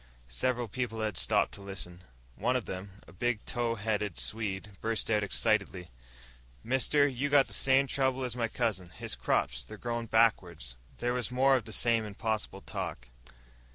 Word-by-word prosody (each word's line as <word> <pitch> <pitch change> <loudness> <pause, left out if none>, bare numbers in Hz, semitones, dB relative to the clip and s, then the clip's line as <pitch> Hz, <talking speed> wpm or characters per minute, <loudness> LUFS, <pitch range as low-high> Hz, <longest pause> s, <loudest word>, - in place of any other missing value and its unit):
Several 125 - 0
people 115 0 -3
had 110 -3 -1
stopped - - +2
to 100 - -10
listen. 95 -3 -6 0.3
One 125 - +1
of 125 - 0
them, 95 +2 -7
a - - -14
big, 120 -3 -1
tow 120 -1 0
headed 105 -3 -1
Swede, 105 -2 -3
burst 115 0 0
out 105 -1 +3
excitedly. 100 -4 +1 0.7
"Mister, 135 +4 +3
you 140 +1 -1
got 140 -1 +6
the - - -11
same 135 0 +4
trouble 130 -1 +1
as 125 -1 -3
my 120 -2 0
cousin. 110 -6 -1
His - - -4
crops, 60 0 0
they're 85 - -10
growin' 120 0 -3
backwards!" 90 - +2 0.2
There 120 0 0
was 125 -2 -1
more 135 +2 +4
of 120 -5 -1
the 110 - -9
same 115 0 +3
impossible 105 -1 -3
talk. - - -5
115 Hz, 170 wpm, -31 LUFS, 100-125 Hz, 0.7 s, got